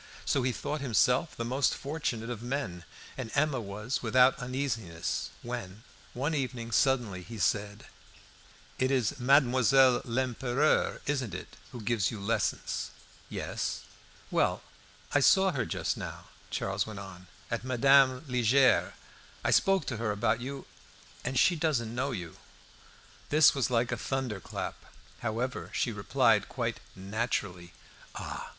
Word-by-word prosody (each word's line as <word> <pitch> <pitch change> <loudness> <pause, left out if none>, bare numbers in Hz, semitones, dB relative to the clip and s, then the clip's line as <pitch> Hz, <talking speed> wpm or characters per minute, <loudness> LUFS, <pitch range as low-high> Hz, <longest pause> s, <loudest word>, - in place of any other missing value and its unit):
So 140 - +2
he 125 0 +1
thought 145 +6 -4
himself 125 +3 +2
the 115 - -2
most 130 +3 +1
fortunate 130 -6 -3
of 115 -3 -5
men 115 -9 -4 0.3
and 125 -4 -4
Emma 145 -3 +2
was 105 +5 -4
without 125 +3 +4
uneasiness, 115 -10 -3
when, 115 -4 -6 0.3
one 140 +6 -1
evening 125 -5 -3
suddenly 120 -7 +2
he 115 +5 -9
said 105 +2 -1 0.9
"It 130 - +2
is 130 -3 0
Mademoiselle 130 -1 +5
Lempereur, 130 +3 +1
isn't 130 -10 -1
it, - - -8 0.2
who 120 - -8
gives 105 -2 +1
you 110 - -6
lessons?" 105 +1 -1 0.4
"Yes." - - -3 0.5
"Well, - - +1 0.5
I 145 - +5
saw 190 +6 +5
her 135 -7 -2
just - - -2
now," - - -7 0.2
Charles 95 +2 -1
went 110 -2 -7
on, 95 -2 -10 0.2
"at 115 - -2
Madame 130 +2 +4
Liegeard's. 125 +1 +3 0.5
I - - +1
spoke 195 -1 +3
to 120 - -3
her 110 -1 -1
about 110 +3 0
you, 135 +2 -6 0.6
and 130 +1 -2
she 175 +6 +5
doesn't 145 -9 0
know 130 +3 -1
you." 90 - -6 0.9
This 155 0 +6
was 135 -4 0
like 120 0 +1
a 120 - -1
thunderclap. 125 -6 -4 0.4
However, 120 +3 -3
she 120 - 0
replied 100 -2 +2
quite - - -2 0.2
naturally 95 -3 -3 0.4
"Ah! - - -6
120 Hz, 135 wpm, -30 LUFS, 110-135 Hz, 0.9 s, This